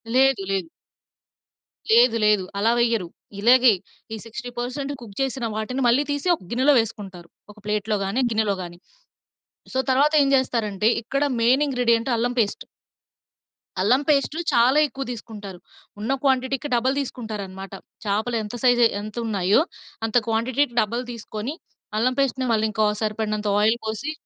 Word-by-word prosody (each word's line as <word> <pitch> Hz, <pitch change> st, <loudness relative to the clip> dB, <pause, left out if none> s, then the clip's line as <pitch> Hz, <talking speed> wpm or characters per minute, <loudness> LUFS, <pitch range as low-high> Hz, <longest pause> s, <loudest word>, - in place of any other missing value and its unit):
లేదు 265 Hz, -3 st, +4 dB
లేదు. 190 Hz, -3 st, -1 dB, 1.2 s
లేదు 230 Hz, 0 st, +5 dB
లేదు. 210 Hz, -2 st, +3 dB, 0.2 s
అలా 225 Hz, +3 st, +3 dB
వెయ్యరు. 230 Hz, -6 st, +1 dB, 0.3 s
ఇలాగే 245 Hz, +3 st, +6 dB, 0.4 s
ఈ -, -, -4 dB
60% 245 Hz, +4 st, -5 dB
కుక్ 210 Hz, -4 st, -11 dB
చేసిన 265 Hz, -2 st, -2 dB
వాటిని 235 Hz, +5 st, -3 dB
మళ్లీ 245 Hz, +5 st, +4 dB
తీసి 285 Hz, +4 st, -3 dB
ఒక 245 Hz, -, -17 dB
గిన్నెలో 260 Hz, +5 st, +4 dB
వేసుకుంటారు. 195 Hz, -6 st, -5 dB, 0.2 s
ఒక -, -, -36 dB
ప్లేట్‌లో 210 Hz, 0 st, -1 dB
గాని, 210 Hz, +7 st, -1 dB
గిన్నెలో 215 Hz, -3 st, 0 dB
గాని. 175 Hz, 0 st, -10 dB, 0.9 s
సో, 260 Hz, -, -1 dB
తర్వాత 280 Hz, +4 st, +3 dB
ఏం 275 Hz, -, +2 dB
జేస్తారంటే 225 Hz, -6 st, +1 dB
ఇక్కడ 275 Hz, +5 st, -2 dB, 0.2 s
మెయిన్ 260 Hz, +5 st, +4 dB
ఇంగ్రీడియెన్ట్ 245 Hz, -2 st, +1 dB
అల్లం 245 Hz, +2 st, -1 dB
పేస్ట్... 205 Hz, -3 st, -1 dB, 1.2 s
అల్లం 245 Hz, +8 st, +3 dB
పేస్టు 290 Hz, +1 st, +2 dB, 0.2 s
చాలా 245 Hz, +4 st, +4 dB
ఎక్కువ 275 Hz, -1 st, -6 dB
తీసుకుంటారు. 210 Hz, -5 st, -9 dB, 0.4 s
ఉన్న 220 Hz, +5 st, -2 dB
క్వాంటిటీకి 265 Hz, +1 st, 0 dB
డబల్ 255 Hz, +3 st, +1 dB
తీసుకుంటారనమాట. 205 Hz, -7 st, -6 dB, 0.3 s
చాపలు 220 Hz, +4 st, 0 dB
ఎంత 210 Hz, +3 st, -7 dB
సైజ్ 245 Hz, -1 st, +4 dB, 0.2 s
ఎంత 215 Hz, 0 st, -8 dB
ఉన్నాయో 200 Hz, +2 st, +2 dB, 0.5 s
అంత 225 Hz, -, +1 dB
క్వాంటిటీకి 240 Hz, +3 st, 0 dB
డబల్ 235 Hz, +4 st, -2 dB
తీసుకొని 225 Hz, +2 st, -6 dB, 0.4 s
అల్లం 250 Hz, +4 st, +2 dB
పేస్ట్‌ని 260 Hz, -1 st, 0 dB
మళ్ళీ 220 Hz, -1 st, +2 dB
ఇంకో 215 Hz, +1 st, +1 dB, 0.2 s
సరిపడినంత 215 Hz, -1 st, -2 dB
ఆయిల్ 220 Hz, +3 st, +3 dB
పోసి 220 Hz, +7 st, -3 dB
230 Hz, 140 wpm, -23 LUFS, 210-260 Hz, 1.2 s, ఇలాగే